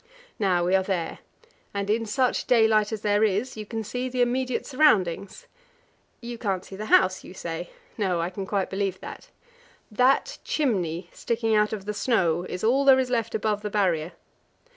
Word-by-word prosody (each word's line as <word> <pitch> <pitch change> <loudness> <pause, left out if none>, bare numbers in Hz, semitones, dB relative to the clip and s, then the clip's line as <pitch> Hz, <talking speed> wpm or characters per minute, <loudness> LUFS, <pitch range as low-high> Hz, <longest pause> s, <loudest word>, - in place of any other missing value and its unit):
Now 180 -4 +2
we 180 - +1
are 190 - +5
there, 185 -4 -3 0.6
and 200 0 -2
in 225 +2 0
such 255 +3 0
daylight 220 -3 +4
as 220 -2 -4
there 205 0 +2
is, 220 +5 0
you 215 -1 -7
can 225 0 -4
see 250 +4 -3
the 250 0 -1
immediate 255 +1 -1
surroundings. 240 - +1 0.8
You 235 -1 -7
can't 195 -5 -2
see 195 - -10
the 215 +2 -6
house, 185 -2 +4
you 185 - -11
say. 170 -1 -5 0.3
No; 185 -4 +1
I 170 +2 -2
can 190 0 -6
quite 195 -2 -1
believe 195 -1 -1
it. - - -9 0.6
That 260 - +2
chimney 180 - -1
sticking 225 -1 -1
out 210 0 +3
of 205 -3 -5
the 210 - -3
snow 180 -6 +1
is 180 - -5
all 255 +5 +3
there 270 -1 +7
is 255 -1 -1
left 230 -2 -1
above 210 -1 -1
the 210 - -3
Barrier. 180 -5 0
210 Hz, 185 wpm, -25 LUFS, 190-235 Hz, 0.8 s, there